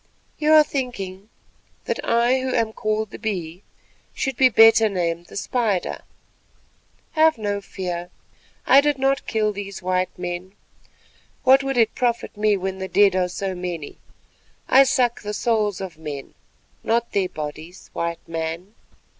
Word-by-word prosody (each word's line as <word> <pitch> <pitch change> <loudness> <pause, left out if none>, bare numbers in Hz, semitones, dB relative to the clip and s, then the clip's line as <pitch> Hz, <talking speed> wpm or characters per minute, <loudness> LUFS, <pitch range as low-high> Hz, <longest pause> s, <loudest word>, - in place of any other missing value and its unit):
You 305 0 +3
are 310 -1 +8
thinking 215 -9 -5 0.6
that - - -3
I 235 +3 +2
who 260 0 -2
am 220 -1 0
called 215 -1 -2
the - - -9
Bee 180 -5 -4 0.5
should 270 -2 -2
be 260 +1 +5
better 225 -1 +6
named 170 -3 -2
the - - -9
Spider. 215 -4 -1 1.1
Have 315 -2 +4
no 205 -2 -2
fear; 180 -3 -5 0.6
I 270 +2 +7
did 295 -1 +1
not 270 +1 0
kill 215 -1 0
these 200 -1 -7 0.3
men. 180 +1 -5 0.9
What 265 0 +6
would 270 -1 -2
it 225 -2 +3
profit 240 -2 -1
me 210 -1 +2
when 190 0 -4
the 190 - -4
dead 200 -1 +4
are 180 -1 +1
so 190 +1 -3
many? 175 -4 -6 0.7
I 270 +1 +7
suck 245 -2 +1
the 210 0 -4
souls 215 -5 0
of 185 -5 -7
men, 145 -3 -7 0.5
not 235 +1 0
their 190 -2 0
bodies, 155 +4 -8
White 170 0 -4
Man. 165 +4 -4
205 Hz, 145 wpm, -22 LUFS, 180-240 Hz, 1.1 s, are